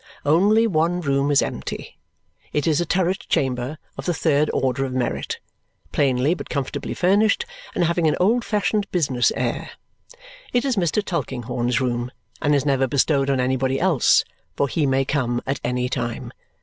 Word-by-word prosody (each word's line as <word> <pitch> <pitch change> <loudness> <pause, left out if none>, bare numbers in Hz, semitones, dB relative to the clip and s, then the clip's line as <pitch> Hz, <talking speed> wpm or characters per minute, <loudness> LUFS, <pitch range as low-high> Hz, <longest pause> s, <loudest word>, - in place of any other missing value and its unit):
Only 200 +9 +4
one 175 -3 +1
room 140 -2 +1
is 145 - +4
empty. 65 - -6 0.5
It 150 - 0
is 160 0 +2
a 175 - -2
turret 185 +1 +1
chamber 130 +2 0 0.2
of - - -5
the 175 - +1
third 150 -1 +2
order 130 0 0
of 130 -1 -3
merit, 130 -1 -2 0.5
plainly 135 +2 +2
but 180 - -7
comfortably 140 -3 -3
furnished 210 - +3 0.3
and - - +2
having 170 -1 +2
an 155 - +2
old 230 +6 +3
fashioned 210 -1 0
business 135 -9 +2
air. - - -2 0.8
It 245 +2 +2
is 265 -3 +1
Mr. 195 +2 0
Tulkinghorn's 125 - -2
room, 120 -1 -1 0.3
and 150 -1 +3
is 140 - +1
never 135 -2 +2
bestowed 140 +1 +2
on 135 -2 +1
anybody 130 +1 0
else, 170 -8 +4 0.3
for 140 - +1
he 145 +1 0
may 135 0 +2
come 125 -4 0
at 135 - -2
any 125 0 0
time. 120 -2 -4
140 Hz, 165 wpm, -22 LUFS, 130-175 Hz, 0.8 s, Only